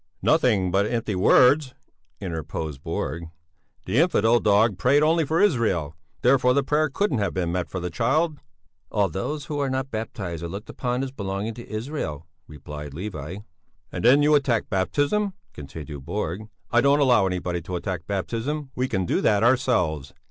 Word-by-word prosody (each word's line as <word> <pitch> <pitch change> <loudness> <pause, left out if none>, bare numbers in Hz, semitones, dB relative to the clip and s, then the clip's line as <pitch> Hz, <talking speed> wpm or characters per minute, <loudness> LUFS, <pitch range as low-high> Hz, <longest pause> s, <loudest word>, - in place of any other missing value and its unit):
"Nothing 110 - +3
but 100 +3 +2
empty 115 -2 -2
words," 130 +8 +4 0.4
interposed 80 -5 -5
Borg. 80 +5 -3 0.6
"The 105 +8 +1
infidel 120 - +4
dog 105 -2 +3
prayed 140 +8 +4
only 165 +1 +3
for 160 +3 +1
Israel; 110 - +1 0.3
therefore 125 0 +4
the 140 - +3
prayer 150 +2 +1
couldn't 145 - 0
have 100 -2 -1
been 90 -2 -1
meant 90 0 -2
for 95 - -4
the 90 0 -4
child." 150 - +1 0.5
"All 100 -2 +1
those 135 - -4
who 145 0 -4
are 140 -1 0
not 130 +1 -2
baptized 100 -6 -5
are 85 - -4
looked 100 +5 -7
upon 125 +1 -2
as 135 - -4
belonging 100 -2 -4
to 120 +1 -11
Israel," 110 - -4 0.2
replied 75 -1 -9
Levi. 90 0 -6 0.5
"And - - -5
then 135 +5 +6
you 150 +1 +4
attacked 135 -6 +1
baptism," 145 - 0 0.2
continued 75 0 -8
Borg. 100 +4 -4 0.2
"I 120 - +4
don't 140 +2 +4
allow 125 -8 +4
anybody 90 -1 -2
to 90 +2 -5
attack 85 -1 -4
baptism 120 +9 -3
we 130 +1 -1
can 95 -6 -1
do - - 0
that 105 0 +3
ourselves. 90 - +1
110 Hz, 170 wpm, -24 LUFS, 90-135 Hz, 0.6 s, then